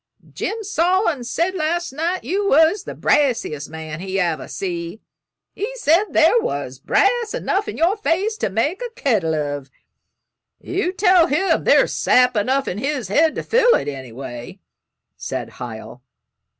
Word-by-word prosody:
Jim 445 0 -3
Sawin 360 - +1
said 335 +9 -1
last 345 -2 -2
night 335 +6 -2
you 400 +3 -1
was 320 +7 +4
the - - -7
brassiest 225 - 0
man 160 0 -7
he 190 +1 -3
ever 170 -4 -1
see. 175 +1 -5 0.5
He 430 +5 -4
said 355 -3 +3
there 475 - +4
was 135 - -4
brass 440 - +1
enough 400 +2 -1
in - - -5
your 345 +5 +2
face 415 +1 0
to - - -1
make 285 - -1
a - - -4
kettle 190 - +1
of." 145 -2 -3 0.9
"You 365 0 -2
tell 365 -3 +4
him 345 +6 +1
there's - - +4
sap 250 -1 +3
enough 260 +6 0
in 190 - -3
his 270 -5 -2
head 310 +9 +3
to - - -4
fill 485 +1 +4
it, - - -2
anyway," 130 -3 -7 0.6
said - - -6
Hiel. 115 0 -8
290 Hz, 150 wpm, -20 LUFS, -, 0.9 s, was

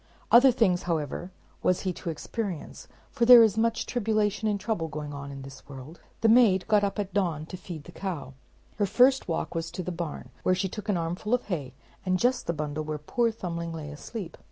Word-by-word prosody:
Other 250 +3 +8
things 205 -8 +2
however, 160 +2 -2 0.3
was 185 0 +2
he 185 -2 -1
to 170 - -6
experience, 185 +2 -5 0.2
for 235 - +1
there 245 -1 +10
is 220 -3 +3
much 230 +1 +1
tribulation 215 -2 0
and 205 -1 0
trouble 205 -6 -2
going 150 -1 -6
on 140 0 -7
in 135 -1 -8
this 135 +1 -12
world. 140 +4 -10 0.2
The 225 - +4
maid 220 -6 +5
got 210 -1 +4
up 200 +1 -1
at 200 -2 -3
dawn 175 -6 0
of - - -11
day - - -13
to 185 - -5
feed 175 -4 -8
the 175 - -12
cow. 170 -9 -5 0.4
Her 205 -2 +1
first 255 +6 +4
walk 165 - -2
was 165 -1 -3
to 175 +2 -5
the 180 - -4
barn, 170 -3 -5
where 185 - +2
she 190 +1 -1
took 210 +2 -7
an 200 - +2
armful 175 +7 -1
of 250 - -4
hay, 145 -9 -4 0.3
and 185 -1 +1
just 245 +6 +1
the - - +2
bundle 150 0 -3
where 155 0 -3
poor 230 +11 0
Thumbling 170 -6 -5
lay 150 -2 -6
asleep. 170 +4 -7
185 Hz, 225 wpm, -27 LUFS, 160-215 Hz, 0.4 s, there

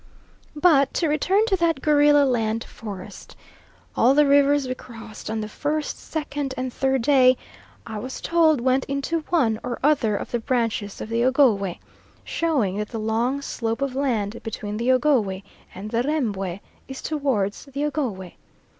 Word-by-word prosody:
But 295 -4 +3
to 335 - +1
return 370 +8 +2
to 430 -4 +2
that 335 -4 +1
gorilla 290 0 +4
land 225 -3 0
forest. 200 -5 -10 0.6
All 255 +4 +4
the 295 0 +5
rivers 285 0 +4
we 255 - -1
crossed 230 -4 -10
on 220 0 -2
the 215 - -4
first, 295 +6 -3
second, 290 -3 -4
and 255 -1 -3
third 265 -2 0
day 255 -2 +5 0.5
I 220 -2 -6
was 255 +4 -6
told 320 -5 +3
went 260 +1 +2
into 280 +4 -2
one 235 -11 +2
or 245 -1 -4
other 265 -8 +3
of - - -7
the 240 - 0
branches 230 -4 -2
of - - -6
the 230 +1 0
Ogowe, 235 -9 +3 0.5
showing 270 - 0
that 210 0 -3
the 230 - -5
long 235 +6 -1
slope 230 -1 -2
of 275 -2 -2
land 235 -6 -1
between 210 -2 -5
the 240 +3 +1
Ogowe 245 -9 +2 0.3
and 205 +3 -7
the 235 0 +1
Rembwe 205 - -2 0.3
is 265 0 -8
towards 265 -11 -1
the 280 +1 -3
Ogowe. 235 - -3
255 Hz, 165 wpm, -23 LUFS, 220-290 Hz, 0.6 s, the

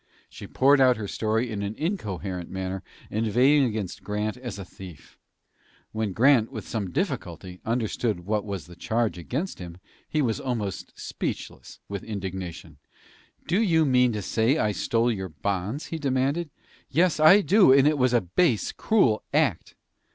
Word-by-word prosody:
She - - -10
poured 135 +1 +4
out 130 -2 +5
her 105 -2 -5
story 110 +3 -1
in 105 -2 -3
an 100 +2 -3
incoherent 100 - -4
manner, 95 0 -4 0.3
inveighing 125 +7 +3
against 105 -6 -4
Grant 105 +1 -2
as 125 -5 -7
a 95 - -7
thief. 90 -7 -13 0.8
When 110 -2 -2
Grant, 115 +2 +4
with - - -7
some 105 -5 -3
difficulty, 90 +1 -4
understood 115 -3 -1
what 105 +1 0
was 100 -7 -5
the 85 - -13
charge 110 +2 -1
against 140 - -4
him, 85 -2 -8 0.3
he 155 -1 +1
was 115 -4 0
almost 110 -7 -4
speechless - - -6
with 100 -1 -5
indignation. 95 -7 -6 0.7
"Do 180 +7 +1
you 165 -7 +3
mean 125 -2 +4
to 105 -2 -3
say 115 - +1
I 105 -7 +1
stole 115 +3 +1
your 95 -4 -4
bonds?" 100 - -3
he 165 - -3
demanded. 140 +4 0 0.4
"Yes, 165 +3 +2
I 170 +7 +7
do; 200 -6 +5
and 135 +1 +6
it 150 -1 +2
was 125 -1 +3
a 120 -1 +3
base, 110 - +1
cruel 160 - +2
act." 140 - +1
110 Hz, 160 wpm, -26 LUFS, 95-135 Hz, 0.8 s, I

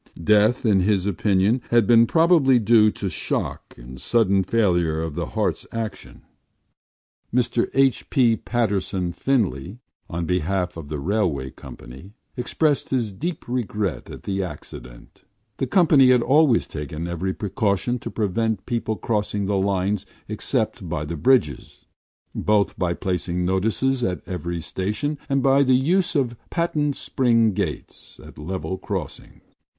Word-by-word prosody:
Death, 105 +6 +3
in 105 -4 +4
his 95 0 +1
opinion, 100 +4 +1
had 120 -2 +4
been 115 +1 +5
probably 160 -5 +4
due 110 -1 +5
to 105 - -4
shock 90 - -4
and 65 +2 -11
sudden 100 -5 +2
failure 90 -7 +1
of 80 -1 -3
the - - -3
heart’s - - -2
action. 115 -1 -6 1.1
Mr 120 -1 +1
H. 135 -1 +2
B. 120 -5 +3
Patterson 100 -7 -1
Finlay, 95 - -1 0.3
on 85 +1 -3
behalf 90 +1 -1
of 80 -4 -9
the 75 - -3
railway 80 -6 -1
company, 65 +12 -12 0.2
expressed 145 +4 0
his 120 -5 -1
deep 165 - -5
regret 105 - -3
at - - -10
the 95 -1 -2
accident. 75 -8 -10 0.3
The - - -2
company 155 -8 +5
had 125 -2 +4
always 140 -2 +4
taken 75 +2 -6
every 90 +2 -3
precaution 105 +2 -1
to - - -6
prevent 110 0 -1
people 115 -2 -2
crossing 105 -2 -2
the 100 +1 0
lines 95 0 0 0.2
except - - -2
by 75 - -3
the 85 +3 -5
bridges, 100 - 0 0.5
both 105 -3 +1
by 85 -2 -1
placing 90 -1 -2
notices 110 +8 0
in 90 -6 -1
every 85 -1 -4
station 105 - -3
and 135 -1 +1
by 135 0 +4
the 130 -2 +4
use 175 +7 +1
of 125 -5 0
patent 150 -4 0
spring 115 -4 +2
gates - - -5
at - - -13
level 90 +2 -4
crossings. - - -6
105 Hz, 140 wpm, -23 LUFS, 90-125 Hz, 1.1 s, been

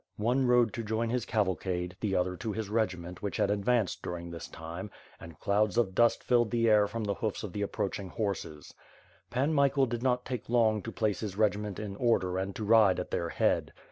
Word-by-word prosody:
One 125 +5 +1
rode 120 -2 +4
to 120 -3 -4
join 110 +1 -1
his 125 -1 -1
cavalcade, 95 -4 -1
the 105 -3 -1
• 90 - +3
thor 90 0 -5
to 110 +4 -4
his 110 -2 -4
regiment 90 -5 -2
which 100 -4 -3
had - - +2
advanced 105 +1 +1
during 85 -1 -5
this 85 -2 -7
time, 85 +5 -7 0.3
and 85 -1 -11
clouds 105 +1 +1
of 115 -6 +2
dust 120 +4 +3
filled 120 -2 +3
the 115 0 +1
air 105 -2 +5
from 115 +2 -4
the 100 -1 0
hoofs 105 +2 -3
of 100 -5 -6
the 105 - -3
ap 100 - -3
proaching 95 -1 -3
horses. 90 -9 -4 0.6
Pan 135 +6 0
Michael 140 -1 +3
did 120 -1 -4
not 125 -1 +1
take 125 -3 -5
long 110 -3 +3
to - - -6
place 110 -4 -1
his 100 -3 -5
regiment 105 -2 0
in 105 -2 -5
order 95 -6 +1
and 95 0 -3
to 110 - -4
ride 105 -3 +5
at 90 - -5
their 85 -1 -1
head. - - +1
105 Hz, 220 wpm, -30 LUFS, 95-115 Hz, 0.6 s, air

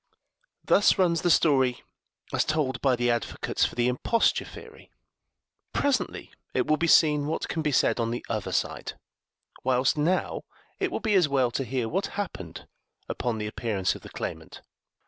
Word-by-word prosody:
Thus 205 - +4
runs 170 -4 +2
the 175 - +1
story 135 -6 +3 0.5
as - - +2
told 145 -5 -1
by 135 -2 +3
the 120 0 +1
advocates 120 0 -1
for - - -4
the 120 0 +1
imposture 125 - +1
theory; - - -13 0.8
presently 280 -3 -1 0.2
it - - +2
will 155 - +3
be 170 - 0
seen 150 -3 +4
what 160 - -2
can 160 - -2
be 150 -1 0
said 130 - +2
on 115 -1 0
the 120 +1 -4
other 110 -3 -3
side; - - -2 0.7
whilst 130 +3 +2
now 175 +5 0 0.4
it - - -1
will - - -3
be 220 -2 0
as 180 -6 +4
well 130 -3 +2
to 135 - -2
hear 125 -1 -2
what 190 - -1
happened 95 - -6 0.4
upon 120 -2 -2
the 105 - -3
appearance 105 -3 -1
of - - -10
the - - -11
claimant. 80 0 -7
135 Hz, 170 wpm, -27 LUFS, 120-160 Hz, 0.8 s, Thus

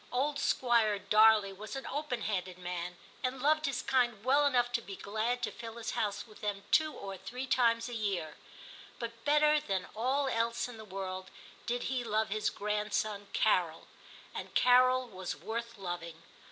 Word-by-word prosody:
Old 285 +3 0
Squire 235 -6 +3
Darley 210 0 +5
was 210 +4 -8
an 270 - -5
open 285 -4 -3
handed 185 -3 -2
man, 180 0 -5 0.2
and 255 +1 -2
loved 310 +3 +3
his 275 -3 -2
kind 240 -5 +1
well 285 +3 +5
enough 245 -3 +2
to 240 -1 0
be 200 -3 -8
glad 220 +6 -2
to - - 0
fill 230 -1 -8
his 230 - -3
house 205 -2 -1
with 215 -2 -16
them 205 -1 -2
two 310 -1 +4
or 195 -6 -7
three 245 +8 -6
times 230 -2 +2
a 245 - -6
year; 195 -9 -2 0.6
but 230 -1 -6
better 300 +1 +5
than 195 -10 -2
all 265 +5 +1
else 230 -1 0
in 245 -2 -9
the 220 - -9
world 185 -1 -5 0.4
did 245 0 -1
he 255 -1 -1
love 220 -1 0
his 215 +1 0
grandson 210 0 -2
Carol, 175 -6 +2 0.5
and - - -7
Carol 255 0 +5
was 190 -4 -5
worth 230 +8 -5
loving. 175 -3 -5
225 Hz, 175 wpm, -32 LUFS, 200-250 Hz, 0.6 s, Darley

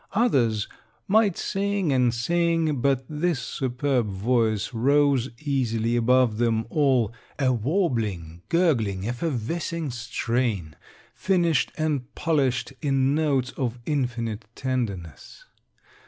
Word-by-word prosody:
Others 125 - +2 0.4
might 205 -2 +3
sing 195 -5 0
and 125 -2 +3
sing, 165 +4 +1
but 135 0 +1
this 155 -1 -1
superb 125 0 -1
voice 110 +2 0
rose 135 +1 +3
easily 120 -6 0
above 120 -1 +3
them 115 -2 +1
all, 130 -7 +2 0.2
a 130 -3 +2
warbling, 110 - -1
gurgling, 115 - +1
effervescing 155 +4 -2
strain, 115 - -2 0.4
finished 175 -6 +1
and 150 -5 -1
polished 135 -5 0
in 135 -1 +2
notes 140 -5 +1
of 125 -3 -3
infinite 120 -6 -2
tenderness. 105 - -4
130 Hz, 100 wpm, -25 LUFS, 115-150 Hz, 0.4 s, might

